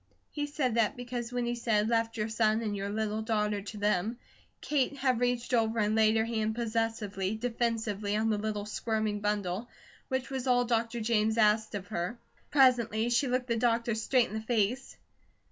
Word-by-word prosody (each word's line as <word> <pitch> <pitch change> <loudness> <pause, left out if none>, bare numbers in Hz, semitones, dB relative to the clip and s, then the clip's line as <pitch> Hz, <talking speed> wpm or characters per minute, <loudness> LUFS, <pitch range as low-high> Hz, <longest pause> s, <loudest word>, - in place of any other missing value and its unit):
He 290 -1 -3
said 285 -5 -1
that 230 -1 +1
because 245 -1 -5
when 245 -1 -1
he 240 - -1
said 220 -3 +1
"left 230 0 0
your 215 0 -1
son 220 0 +1
and 210 -2 -2
your 200 0 -3
little 215 +1 -2
daughter 210 -2 0
to 210 +2 -8
them," 210 +2 0 0.4
Kate 285 -1 0
had 255 -3 +1
reached 245 0 0
over 225 -1 +2
and 210 -1 +2
laid 220 0 +4
her 220 - +2
hand 220 -1 -1
possessively, 220 -4 -1
defensively, 225 -3 -1
on 220 +1 +1
the 210 - 0
little, 210 -1 -3
squirming 215 -1 -1
bundle, 205 +1 -2 0.4
which 260 0 -2
was 265 -1 -3
all 245 -1 +3
Dr. 230 0 0
James 220 0 +1
asked 215 0 +3
of 200 -1 -4
her. 180 +3 -3 0.3
Presently 240 -4 +3
she 240 +4 +2
looked 250 0 0
the 235 -2 0
doctor 235 0 +1
straight 235 +3 +2
in - - -9
the 220 - -3
face. 230 +3 -1
225 Hz, 185 wpm, -30 LUFS, 215-240 Hz, 0.4 s, laid